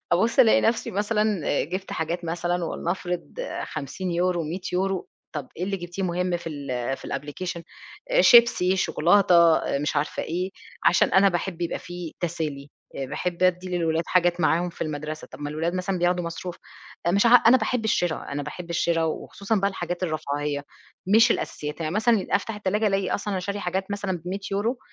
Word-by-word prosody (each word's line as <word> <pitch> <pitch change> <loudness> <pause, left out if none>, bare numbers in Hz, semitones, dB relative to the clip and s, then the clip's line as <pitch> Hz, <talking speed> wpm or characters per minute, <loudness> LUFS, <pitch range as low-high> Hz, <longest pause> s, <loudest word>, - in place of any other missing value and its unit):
أبُصّ 225 +8 +2
ألاقي 235 -4 +7
نَفْسي 225 0 +1
مثلًا 210 +2 0 0.4
جِبت 185 +5 -5
حاجات 170 +2 -2
مثلًا 175 +1 -1
ولنفرض 175 +1 -3 0.3
50€، 175 +4 -2
100€، 185 +3 -2 0.2
"طَب 145 -5 -5
إيه 175 - -2
اللي 195 +1 -2
جبتيه 175 +1 -6
مُهم 180 0 0
في 170 - -7
ال 135 -4 -3
في - - -10
الapplication؟" 170 +4 -4 0.5
"آآ - - +5
شيبسي، 230 -6 +6
شوكولاتة،" 170 -2 +5
آآ - - -1
مش 150 +1 -1
عارفة 145 +2 -1
إيه، 180 +3 -2 0.3
"عشان 175 - +5
أنا 195 +2 +6
باحب 175 -1 -3
يبقى 170 - -2
في 175 -2 -7
تسالي، 155 -5 -3 0.3
آآ 135 - -2
باحب 175 +5 -3
أدي 185 0 +2
للولاد 165 -1 +1
حاجات 175 -1 +2
معاهم 175 +2 +2
في - - -6
المدرسة،" 155 0 -5
"طَب - - -10
ما 145 0 -4
الولاد 165 +4 -2
مثلًا 185 0 -1
بياخدوا 175 0 +1
مصروف،" 170 +1 -5 0.5
آآ، - - +4
مش 200 +5 +3
عا 235 - +6
أنا 245 +2 +6
باحب 235 0 -1
الشرا، 175 -9 0
أنا 145 0 -2
باحب 170 +4 -7
الشرا 170 0 +1
وخصوصًا 200 +6 -2
بقى 200 -1 +2
الحاجات 175 -1 -4
الرفاهية، 145 -3 -2 0.5
مش 230 +1 +6
الأساسيات، 150 -5 -2
يعني 155 +1 -2
مثلًا 220 -1 +2
أفتح 225 +2 0
التلاجة 210 +1 0
ألاقي 195 -1 +1
أصلًا 205 +1 -2
أنا 185 - -1
شارية 200 +2 -3
حاجات 190 +1 -2
مثلًا 200 -3 -2
ب100€ 200 +6 -2
175 Hz, 175 wpm, -25 LUFS, 165-195 Hz, 0.5 s, ألاقي